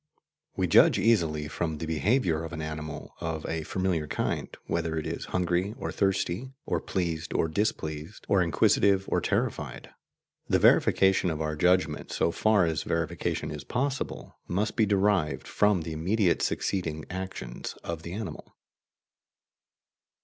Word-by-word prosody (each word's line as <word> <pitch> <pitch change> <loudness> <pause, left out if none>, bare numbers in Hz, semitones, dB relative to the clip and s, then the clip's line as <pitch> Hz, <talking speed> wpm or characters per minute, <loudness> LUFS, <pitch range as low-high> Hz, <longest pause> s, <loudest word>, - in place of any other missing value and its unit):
We 95 - +1
judge 85 - +6
easily 85 -8 +2
from 80 +1 -2
the 80 - -4
behaviour 80 - +1
of 80 +1 -6
an 80 - -4
animal 75 -1 -6
of 80 -1 -3
a 80 0 -2
familiar 85 -1 -1
kind - - -2 0.2
whether 80 -1 -1
it 80 - -2
is - - -4
hungry 90 +3 0
or - - -4
thirsty, 100 +6 -1
or - - 0
pleased 85 -3 -2
or - - +2
displeased, 80 -1 -3
or 100 -2 +4
inquisitive 95 +4 +3
or - - +1
terrified. - - -2 0.6
The - - +3
verification 95 -1 +4
of 80 -2 -3
our 75 -1 -1
judgment, 90 -2 +1
so - - +1
far 105 0 +3
as 80 -2 0
verification 85 0 -2
is - - -6
possible, 140 +2 -3
must 100 +5 -1
be 110 -2 +3
derived 100 -5 +1
from 105 -5 +2
the 80 - -5
immediately 90 +4 +1
succeeding 80 -5 -1
actions 95 -10 -5
of 85 -2 -4
the 85 +1 -7
animal. 105 +1 -7
85 Hz, 145 wpm, -28 LUFS, 80-100 Hz, 0.6 s, judge